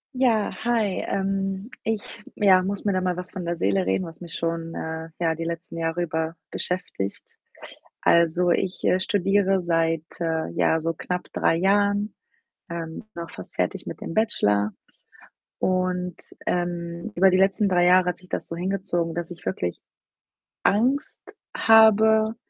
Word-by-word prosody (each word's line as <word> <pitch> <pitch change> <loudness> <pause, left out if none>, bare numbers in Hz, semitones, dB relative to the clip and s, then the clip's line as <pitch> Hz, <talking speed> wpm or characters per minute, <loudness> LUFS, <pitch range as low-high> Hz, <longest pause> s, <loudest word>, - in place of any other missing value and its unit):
Ja, 235 -5 +2
hi. 225 -5 +1
Ähm, 195 +1 -2
ich, 220 0 -4
ja, 190 -3 +5
muss 200 +1 -3
mir 205 - +1
da 185 - +1
mal 180 -1 0
was 180 +1 -6
von 180 -2 -6
der 170 0 -2
Seele 190 +2 +1
reden, 185 - 0
was 165 0 -11
mich 170 -2 -9
schon, 165 0 -3
äh, 160 0 -5
ja, 165 -2 +1
die 165 - -4
letzten 165 0 -5
Jahre 165 +1 -1
über 160 -1 -2
beschäftigt. 180 - -3 0.8
Also 170 +1 +4
ich, 185 +1 -1
äh, 185 - +3
studiere 195 0 +2
seit, 165 -2 +1 0.2
äh, 160 - -1
ja, 160 - +2
so 165 +1 -1
knapp 180 +2 -4
3 - - +2
Jahren, 200 +3 +2 0.6
ähm, 165 +3 -6
bin 170 - -5
auch 165 - -11
fast 95 - -11
fertig - - -1
mit - - -7
dem - - -5
Bachelor 105 - +2 0.9
und, 185 -1 0 0.3
ähm, 175 +2 -2
über 190 +2 +5
die 185 - +3
letzten 195 +2 +3
3 175 -2 +3
Jahre 180 0 +5
hat 180 - -5
sich 185 0 -19
das - - -3
so 165 - -6
hingezogen, 175 -2 -1
dass 170 0 -4
ich 170 -4 -10
wirklich 90 -2 -2 0.8
Angst 250 +8 0 0.2
habe, 220 0 +6
180 Hz, 160 wpm, -24 LUFS, 165-195 Hz, 0.9 s, habe